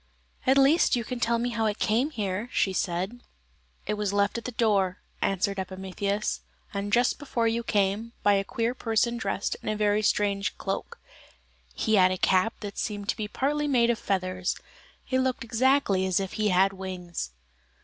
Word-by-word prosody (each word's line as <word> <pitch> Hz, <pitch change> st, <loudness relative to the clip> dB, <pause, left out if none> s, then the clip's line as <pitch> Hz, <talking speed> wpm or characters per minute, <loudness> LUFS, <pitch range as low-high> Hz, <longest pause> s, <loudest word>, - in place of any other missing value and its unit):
"At 265 Hz, +1 st, +5 dB
least 275 Hz, +4 st, +5 dB
you 240 Hz, -, -1 dB
can 250 Hz, +2 st, -5 dB
tell 235 Hz, 0 st, +2 dB
me 240 Hz, +1 st, -1 dB
how 225 Hz, -1 st, 0 dB
it 210 Hz, -, -1 dB
came 235 Hz, +7 st, +1 dB
here," 210 Hz, -4 st, -3 dB
she 190 Hz, -, +1 dB
said. 185 Hz, +7 st, -2 dB, 0.6 s
"It 210 Hz, -, -1 dB
was 210 Hz, -2 st, -1 dB
left 200 Hz, +3 st, +1 dB
at -, -, -15 dB
the 250 Hz, -, -3 dB
door," 200 Hz, -6 st, +2 dB, 0.2 s
answered 195 Hz, +1 st, 0 dB
Epimetheus, 190 Hz, +2 st, -2 dB, 0.5 s
"just 240 Hz, +3 st, +2 dB
before 240 Hz, -5 st, 0 dB
you 230 Hz, +1 st, 0 dB
came, 210 Hz, +1 st, 0 dB
by 205 Hz, -, +5 dB
a 195 Hz, 0 st, +2 dB
queer 230 Hz, +4 st, -1 dB
person 235 Hz, -1 st, 0 dB
dressed 195 Hz, -2 st, -2 dB
in -, -, -4 dB
a 215 Hz, -, 0 dB
very 210 Hz, 0 st, +2 dB
strange 200 Hz, -1 st, +1 dB
cloak; 195 Hz, -, -4 dB, 0.8 s
he 220 Hz, -1 st, +2 dB
had 185 Hz, -1 st, +6 dB
a 185 Hz, -, -1 dB
cap 190 Hz, +5 st, +2 dB
that 205 Hz, -2 st, -6 dB
seemed 205 Hz, -1 st, -3 dB
to -, -, +2 dB
be 215 Hz, -, -3 dB
partly 295 Hz, +6 st, 0 dB
made 240 Hz, -4 st, +4 dB
of 230 Hz, -, -2 dB
feathers; 185 Hz, -1 st, -1 dB, 0.5 s
it 260 Hz, -, +1 dB
looked 260 Hz, -2 st, 0 dB
exactly 235 Hz, -5 st, +2 dB
as 185 Hz, 0 st, +2 dB
if 195 Hz, -1 st, -4 dB
he 215 Hz, -1 st, +1 dB
had 190 Hz, +1 st, +4 dB
wings." 180 Hz, -, -5 dB
210 Hz, 180 wpm, -27 LUFS, 195-235 Hz, 0.8 s, had